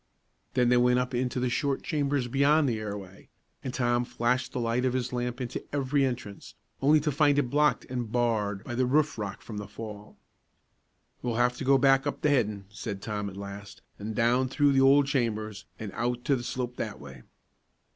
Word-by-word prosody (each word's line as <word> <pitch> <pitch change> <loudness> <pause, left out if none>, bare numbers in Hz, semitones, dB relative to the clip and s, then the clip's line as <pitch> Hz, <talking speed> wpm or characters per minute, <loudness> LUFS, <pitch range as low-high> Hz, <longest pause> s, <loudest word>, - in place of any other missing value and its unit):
Then 125 -2 +3
they 125 - +5
went 125 0 +4
up 125 0 -1
into 125 +1 -1
the 125 - +1
short 140 +2 0
chambers 140 -4 0
beyond 140 +4 +3
the 115 -4 0
airway, 100 -3 -7 0.3
and 130 - -3
Tom 120 -1 +1
flashed 125 +2 -1
the - - -3
light 115 +1 0
of 130 -1 +1
his 125 -1 -2
lamp 125 0 -2
into 125 -2 -4
every 140 0 +1
entrance, 120 -6 -4 0.3
only 150 +3 +5
to 150 +1 0
find 145 0 +3
it 130 -4 +1
blocked 150 +1 +2
and 125 -4 -4
barred 110 -5 0
by 120 - -6
the 125 +1 +1
roof 150 -1 +2
rock 100 -2 -5
from 110 - -7
the 105 - -5
fall. 105 -2 -9 1.0
"We'll 120 -2 -2
have 120 +1 +2
to - - -4
go 135 +1 +5
back 135 0 +4
up 145 - -3
the 150 - +3
headin'," 105 -7 +1
said 105 -1 -5
Tom, 105 0 -3
at 95 - -11
last, 100 +1 -9 0.2
"an' 105 +2 -4
down 125 +3 +2
through 145 +1 +3
the 135 -1 +4
old 140 +1 +6
chambers, 110 -6 -2
an' 110 -3 -6
out 120 +1 -2
to 140 - +3
the 125 - -3
slope 125 0 -4
that 105 - -4
way." 65 -3 -11
125 Hz, 205 wpm, -28 LUFS, 110-135 Hz, 1.0 s, old